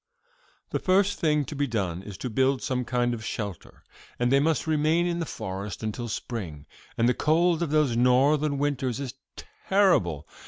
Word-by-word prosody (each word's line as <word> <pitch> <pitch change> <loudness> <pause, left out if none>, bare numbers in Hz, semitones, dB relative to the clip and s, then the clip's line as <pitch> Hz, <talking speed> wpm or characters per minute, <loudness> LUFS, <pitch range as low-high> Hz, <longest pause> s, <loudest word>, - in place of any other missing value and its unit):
"'The - - 0
first 195 +2 +2
thing 150 -3 +2
to 150 - -7
be 145 0 0
done 95 -7 -2
is 100 -1 -9
to - - -4
build 130 +3 +1
some 130 -2 -1
kind 120 0 0
of 110 -2 -6
shelter, 105 -5 -6 0.3
for 120 - 0
they 135 +3 +4
must 160 +2 +1
remain 160 +2 +2
in 175 -1 -1
the 165 - -3
forest 100 +3 -6
until 110 +3 -3
spring, 95 -10 -5 0.3
and 115 - +3
the 125 - +4
cold 165 +4 +2
of 170 - 0
those 150 -5 +2
Northern 140 +4 +3
winters 135 -3 -1
is 135 -3 -5 0.6
terrible. 95 - +3
130 Hz, 180 wpm, -26 LUFS, 115-155 Hz, 0.6 s, they